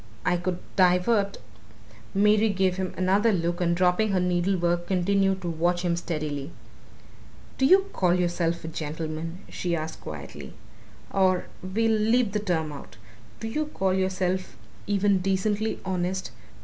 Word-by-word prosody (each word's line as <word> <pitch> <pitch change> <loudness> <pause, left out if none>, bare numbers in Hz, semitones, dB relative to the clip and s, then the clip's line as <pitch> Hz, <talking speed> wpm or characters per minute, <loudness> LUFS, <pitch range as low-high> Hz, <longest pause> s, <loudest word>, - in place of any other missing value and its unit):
"I 180 - +3
could 175 0 -2 0.2
divert 195 +3 +3 0.4
" 110 +1 -23
Mary 215 +1 +4
gave 190 -2 +1
him 185 -1 -2
another 195 +5 +3
look 175 -1 -1
and 170 -1 +2
dropping 185 +4 +2
her 185 - +3
needlework 175 -1 +1
continued 195 +1 +1
to - - -3
watch 175 +2 0
him 175 -1 +1
steadily. 150 -4 -3 1.1
"Do 265 - +4
you 385 +4 +6
call 180 -2 +2
yourself 170 -1 0
a - - -5
gentleman?" 160 +2 -5
she 175 -1 -2
asked 160 0 -5
quietly. - - -8 0.6
"Or 185 -2 +2 0.2
we'll 220 +5 0
leave 225 0 +3
the 210 - 0
term 165 -6 -1
out. 140 -5 -10 0.4
Do 225 - -4
you 300 +7 -2
call 190 -10 0
yourself 185 -1 -1 0.3
even 200 -1 +2
decently 205 +3 0
honest? 185 0 -2
185 Hz, 145 wpm, -26 LUFS, 175-200 Hz, 1.1 s, you